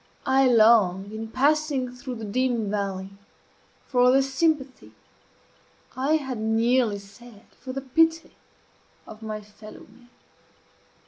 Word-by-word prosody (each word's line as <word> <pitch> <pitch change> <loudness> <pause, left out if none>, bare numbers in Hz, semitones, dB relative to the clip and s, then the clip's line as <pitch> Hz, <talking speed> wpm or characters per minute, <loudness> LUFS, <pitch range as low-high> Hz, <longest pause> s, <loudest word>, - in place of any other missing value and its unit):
I 265 0 +3
long, 215 -5 +4
in 220 +1 -6
passing 280 +1 0
through 250 0 -7
the 225 -1 -7
dim 235 -1 -1
valley, 195 -2 -3 0.7
for 250 -1 +3
the 270 +1 +4
sympathy 270 -1 -2 1.0
I 270 +4 +1
had 265 -6 -3
nearly 225 0 +1
said 205 +2 -15
for 255 - -10
the 270 +1 -5
pity 325 +5 +1 0.7
of 215 - -12
my 215 -1 -6
fellow 210 +1 -14
men. 240 +3 -19
245 Hz, 120 wpm, -25 LUFS, 215-265 Hz, 1.0 s, long